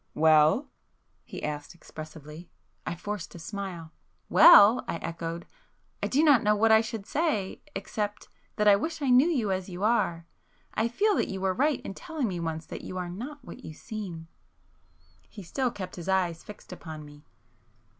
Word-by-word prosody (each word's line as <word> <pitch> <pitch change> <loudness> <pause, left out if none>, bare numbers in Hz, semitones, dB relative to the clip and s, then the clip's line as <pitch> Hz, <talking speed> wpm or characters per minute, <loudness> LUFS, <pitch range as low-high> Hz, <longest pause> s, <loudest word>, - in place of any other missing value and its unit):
"Well?" 160 - +4 0.5
he - - -8
asked 150 +2 -5
expressively. 155 0 -11 0.4
I - - -2
forced 205 0 -6
a - - -7
smile. 175 -2 -6 0.4
"Well!" 220 -4 +8
I - - -2
echoed—"I 165 +1 -7
do 290 +4 +2
not 290 -6 +6
know 210 -2 +3
what 220 +2 +3
I 220 0 +7
should 220 -2 -6
say,—except—that 210 - -3
I 205 - +8
wish 310 +8 -3
I 265 - +2
knew 255 +5 +6
you 245 - 0
as 185 0 -2
you 180 +2 -6
are. 175 -7 +1 0.5
I 225 - +1
feel 410 - +1
that - - +1
you 190 - -4
were 190 0 0
right 285 +5 +1
in - - -7
telling 310 - -4
me 180 -4 -3
once 160 -1 -4
that - - -8
you 185 - -7
are 180 -1 -3
not 250 +9 -8
what 255 - -11
you 155 - -8
seem." 185 -7 -7 1.0
He 205 - -10
still 255 +9 -1
kept 185 -5 -8
his 175 +2 -6
eyes 180 -4 0
fixed 210 -3 -11
upon 160 -4 -9
me. 145 0 -15
195 Hz, 170 wpm, -28 LUFS, 170-235 Hz, 1.0 s, Well